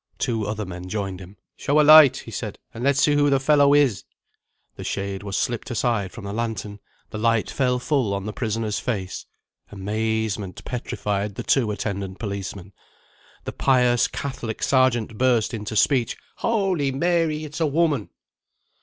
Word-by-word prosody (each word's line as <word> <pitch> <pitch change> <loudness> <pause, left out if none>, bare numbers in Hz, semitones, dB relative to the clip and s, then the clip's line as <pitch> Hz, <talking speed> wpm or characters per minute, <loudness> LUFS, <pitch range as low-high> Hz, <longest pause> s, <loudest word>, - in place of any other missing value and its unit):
Two 110 -3 -1
other 105 0 -3
men 90 0 -8
joined 95 -3 -3
him. 95 +2 -12 0.2
"Show 145 +2 +1
a - - +6
light," 150 -3 +8
he 115 - -9
said; 105 -2 -5 0.2
"and 115 - -6
let's 140 0 +3
see 150 - +4
who 145 0 +3
the 135 -1 +3
fellow 145 +1 +4
is." 135 -9 +3 0.7
The - - -8
shade 100 0 -3
was 100 -2 -4
slipped 120 0 -2
aside 115 -5 0
from 115 -4 -9
a 100 - -5
lantern: 105 -3 -4 0.3
the 110 - -5
light 115 0 +1
fell 125 -2 +1
full 125 -4 0
on 100 0 -4
the 105 - -4
prisoner's 110 -2 -2
face. 95 -7 -4 0.4
Amazement 105 -1 -3
petrified 105 -4 -3
the - - -5
two 125 -6 +2
attendant 100 -2 -4
policemen. 100 -2 -6 0.7
The - - -5
pious 125 -3 +3
Catholic 120 -5 -5
Sergeant 120 -5 +2
burst 125 -3 +2
into 110 -1 -5
speech: 125 +2 +2 0.2
"Holy 190 -11 0
Mary! 160 +1 0
it's 150 +1 -7
a 160 - +2
woman!" 150 -6 +1
115 Hz, 165 wpm, -23 LUFS, 100-135 Hz, 0.7 s, light